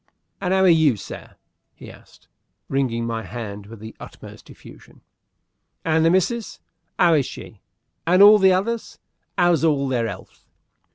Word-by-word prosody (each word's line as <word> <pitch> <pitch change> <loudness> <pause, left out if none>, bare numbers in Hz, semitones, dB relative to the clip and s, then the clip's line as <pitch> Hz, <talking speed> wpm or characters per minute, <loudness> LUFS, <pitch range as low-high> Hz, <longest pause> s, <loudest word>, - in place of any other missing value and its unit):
"And 180 -2 -2
'ow 190 0 +2
are - - +5
you, 160 -8 +4
sir?" - - -10 0.4
he - - -12
asked, - - -20 0.4
wringing 125 -4 -1
my 115 -1 -3
hand 105 -3 -8
with 115 0 -12
the 110 +1 -11
utmost - - -13
effusion. - - -16 0.8
"And 160 0 +2
the 165 - +4
missis, 205 +6 -1 0.4
'ow 170 -2 +4
is 145 -4 +1
she? 105 - -11 0.5
And 180 +3 +5
all 210 +1 +8
the 190 -1 +5
others 220 +5 -2 0.4
'ow's 175 -3 +2
all 145 -4 +1
their 120 -3 -1
'ealth?" 95 -3 -10
160 Hz, 155 wpm, -21 LUFS, 115-185 Hz, 0.8 s, all